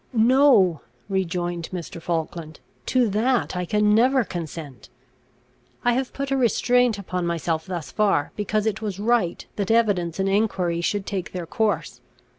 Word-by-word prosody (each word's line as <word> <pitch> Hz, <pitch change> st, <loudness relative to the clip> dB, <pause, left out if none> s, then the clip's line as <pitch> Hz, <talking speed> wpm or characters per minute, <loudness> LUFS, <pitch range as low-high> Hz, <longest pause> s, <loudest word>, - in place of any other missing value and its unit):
"No," 230 Hz, -, +4 dB, 0.3 s
rejoined 175 Hz, -3 st, -2 dB
Mr. 175 Hz, -1 st, -6 dB
Falkland, 165 Hz, -2 st, -4 dB, 0.3 s
"to 255 Hz, -2 st, +3 dB
that 230 Hz, +2 st, +1 dB
I 180 Hz, 0 st, -2 dB
can 210 Hz, +3 st, +2 dB
never 255 Hz, +4 st, +4 dB
consent. 160 Hz, -, -7 dB, 1.0 s
I 245 Hz, -, +4 dB
have 260 Hz, +1 st, -1 dB
put 275 Hz, 0 st, -4 dB
a -, -, +3 dB
restraint 245 Hz, -1 st, +2 dB
upon 180 Hz, -3 st, -3 dB
myself 165 Hz, 0 st, -2 dB
thus 175 Hz, -4 st, -5 dB
far, 195 Hz, -8 st, +1 dB
because 210 Hz, +1 st, -1 dB
it 220 Hz, 0 st, -1 dB
was 205 Hz, -4 st, -3 dB
right 215 Hz, -5 st, +1 dB
that 200 Hz, -2 st, -2 dB
evidence 205 Hz, -7 st, +2 dB
and 190 Hz, -, +1 dB
enquiry 195 Hz, -4 st, 0 dB
should 200 Hz, +3 st, -1 dB
take 190 Hz, -3 st, -4 dB
their 180 Hz, -2 st, -4 dB
course. 200 Hz, -, -1 dB
195 Hz, 150 wpm, -23 LUFS, 170-225 Hz, 1.0 s, No